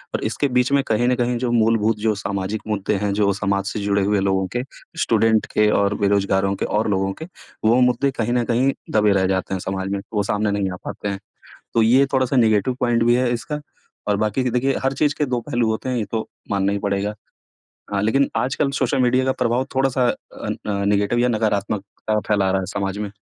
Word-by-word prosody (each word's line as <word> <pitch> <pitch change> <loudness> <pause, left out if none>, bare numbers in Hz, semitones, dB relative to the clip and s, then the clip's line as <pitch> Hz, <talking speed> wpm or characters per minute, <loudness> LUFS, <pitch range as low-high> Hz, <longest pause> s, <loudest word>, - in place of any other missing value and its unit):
और - - -3
इसके 145 - 0
बीच 125 +2 +2
में 140 -1 +3
कहीं 115 +2 +1
न 125 - +3
कहीं 120 0 0
जो 120 0 -1
मूलभूत 115 -1 +2
जो 110 0 +1
सामाजिक 100 +1 -3
मुद्दे 105 -1 -1
हैं, 100 0 -1
जो 100 -1 +2
समाज 100 0 -1
से 110 - -3
जुड़े 100 -1 +1
हुए 100 0 +2
लोगों 95 -1 +1
के, 125 - 0 0.4
स्टूडेंट 110 -1 +3
के 105 0 +4
और 100 0 +2
बेरोजगारों 100 -1 +1
के - - -2
और 110 +1 0
लोगों 95 -1 0
के, - - -4 0.4
वो 120 +3 +5
मुद्दे 125 +2 +2
कहीं 120 +2 0
न 120 -1 +2
कहीं 125 +3 +2 0.2
दबे 105 -1 +3
रह 95 -1 +2
जाते 95 0 -1
हैं 95 - -1
समाज 95 0 -3
में, 100 - -1
वो 105 -1 +1
सामने 105 0 0
नहीं 100 -2 0
आ - - -5
पाते 105 - -5
हैं। 100 -1 -3 0.5
तो 115 - +3
ये 130 +5 +5
थोड़ा-सा 130 0 +1
नेगेटिव 110 +1 +3
पॉइंट 120 -2 +2
भी 120 +1 +4
है 125 -1 +1
इसका 150 +5 -4 0.5
और 100 -1 +2
बाकी 110 +4 0
कि 125 - 0
देखिए 130 +3 +1
हर 135 +1 +1
चीज़ 145 +1 +1
के 150 - +1
2 125 -3 -1
पहलू 120 -5 -1
होते 110 +4 -3
हैं 125 - -1
ये 110 - -1
तो 110 -1 -2 0.2
मानना 100 0 +1
ही 100 - -1
पड़ेगा। 100 +1 -1 0.8
हाँ, 100 0 0
लेकिन 135 +6 +2
आजकल 135 +2 0
सोशल 130 0 +1
मीडिया 130 +1 +3
का 130 - +2
प्रभाव 120 +2 0
थोड़ा-सा 130 -1 +2 0.4
अन - - -2
अ, 100 -1 -1
नेगेटिव 100 +3 +1
या 125 - +3
नकारात्मक 105 -3 0 0.2
अ, 110 0 +2
फैला 100 -3 +2
रहा 95 0 +1
है 95 - -4
समाज 100 0 -2
में। 105 -1 -4
110 Hz, 225 wpm, -21 LUFS, 100-125 Hz, 0.8 s, वो